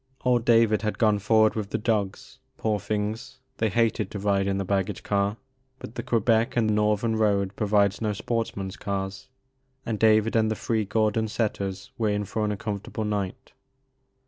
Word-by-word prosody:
Old 120 -2 +2
David 115 -3 +4
had 105 -1 -2
gone 105 -3 +3
forward 110 +1 +4
with 105 -3 -4
the - - -1
dogs; 105 -3 -2 0.2
poor 110 -2 0
things, 105 +4 -3 0.2
they 110 - +1
hated 110 -1 +1
to - - -6
ride 100 -1 +1
in 100 0 0
the 100 - -2
bag 95 0 +1
gage - - -6
car, 100 +1 0 0.4
but 110 - -9
the 120 - -4
Quebec 115 0 +1
and 110 -2 +2
Northern 105 +1 +1
road 100 -3 +1
provides 100 -1 +2
no 110 -1 0
sportsman's 105 -2 -3
cars, 95 +2 -4 0.6
and 110 -3 -2
David 110 0 +4
and 110 -1 +3
the 110 - -1
three 110 0 -1
Gordon 110 +1 +1
setters 100 0 -3
were 110 -2 +2
in 105 0 -1
for 105 +2 -2
an 105 - 0
uncom 105 -1 -3
fortable 110 - -5
night. 100 -3 -3
105 Hz, 180 wpm, -26 LUFS, 100-110 Hz, 0.6 s, David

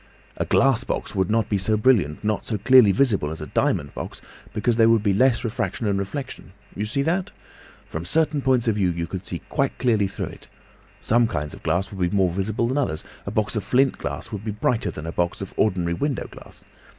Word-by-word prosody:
A - - -1
glass 135 -4 +3
box - - -4
would 95 -3 0
not 110 -1 +2
be 100 -3 0
so 110 +3 +2
brilliant, 105 - +2
nor 105 -1 +1
so 110 - -3
clearly 125 0 +6
visible, 100 - +2
as 80 - -6
a 75 - -5
diamond 70 -1 0
box, - - -7 0.3
because 110 +2 0
there 115 -1 +6
would 115 -2 +3
be 100 -2 +2
less 125 +4 +3
refraction 115 0 -2
and 100 -2 +1
reflection. 125 -1 -6 0.3
See 130 +6 0
that? 180 +5 0 0.6
From 80 - -5
certain 150 - +1
points 130 -3 +2
of 110 -2 +2
view 95 -3 +2
you 85 -1 -3
would 95 0 -5
see 85 - -5
quite 140 -2 -1
clearly 110 -6 +2
through - - -4
it. - - -13 0.5
Some 120 +1 +3
kinds 75 -8 -3
of - - -11
glass 90 +5 -1
would 100 - -8
be 100 - -3
more 95 -2 +3
visible 105 +6 -1
than 130 +4 0
others, 80 - -1 0.2
a - - 0
box 105 +2 -1
of 105 - -1
flint 130 +5 +2
glass 70 +4 -5
would 105 -2 -5
be 110 - -4
brighter 105 +3 0
than 75 - -7
a 80 - -3
box 85 0 -1
of 95 - -7
ordinary 90 -5 +1
window 140 - -2
glass. - - -14
105 Hz, 220 wpm, -23 LUFS, 95-120 Hz, 0.6 s, clearly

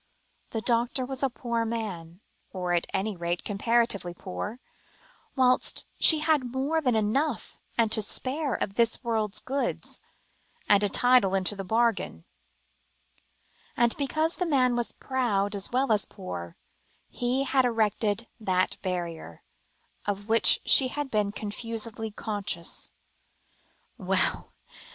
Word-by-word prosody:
The 225 - -3
doctor 240 +3 +1
was 265 0 -5
a 275 - +2
poor 235 -1 -2
man, 200 -7 -5 0.3
or 180 -2 -2
at 175 - +1
any 200 +2 -1
rate 175 0 -3
comparatively 205 -4 0
poor, 90 - -6 0.8
whilst 255 -2 +2
she 315 -2 +8
had 300 -6 +1
more 280 +5 0
than 250 -6 +1
enough 230 +6 -1 0.2
and 225 -2 +2
to 220 - +2
spare 270 +7 -2
of 195 - -3
this 230 +4 +2
world's 220 -3 -1
goods, 275 +2 -2 0.7
and 205 -1 +5
a 205 - +2
title 245 -6 +4
into 190 +2 +1
the 195 - -5
bargain; 220 - 0 1.5
and 235 0 +3
because 310 +4 0
the 360 - -1
man 255 -5 +3
was 240 -1 0
proud 220 -6 -1
as 200 -1 -3
well 260 0 +1
as 210 -2 +3
poor, 85 -2 -8 0.5
he 250 +2 -1
had 270 -1 +2
erected 220 -1 0
that 185 -4 0
barrier, 170 - -5 0.6
of 205 0 -3
which 225 +1 +5
she 265 - +8
had 285 +1 -4
been 210 -2 +1
confusedly 225 +1 -5
conscious. 205 -5 -4 1.1
Well! - - 0
225 Hz, 130 wpm, -27 LUFS, 200-255 Hz, 1.5 s, she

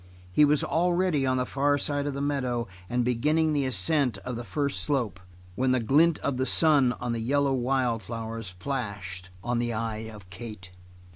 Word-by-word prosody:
He 150 +11 +5
was 150 0 +3
already 175 -4 +1
on 130 0 +2
the 125 - 0
far 145 +2 +1
side 145 0 -1
of 140 - -3
the 140 - -3
meadow, 125 -5 -1 0.2
and 120 0 0
beginning 155 +6 +2
the 145 -2 +1
ascent 130 +1 +1
of 125 -1 -3
the 120 - -5
first 140 +6 -1
slope 125 -9 -1 0.3
when 130 +5 +1
the 130 - +2
glint 150 +8 +4
of 140 -2 -1
the 130 +1 0
sun 145 -6 +5
on 120 0 -4
the 115 - -2
yellow 140 +4 +1
wild 125 -2 0
flowers 115 0 -5
flashed 95 -4 -5
on 120 0 0
the 120 0 -1
eye 110 0 -3
of 105 -4 -12
Kate. 95 -2 -9
125 Hz, 190 wpm, -27 LUFS, 115-145 Hz, 0.3 s, He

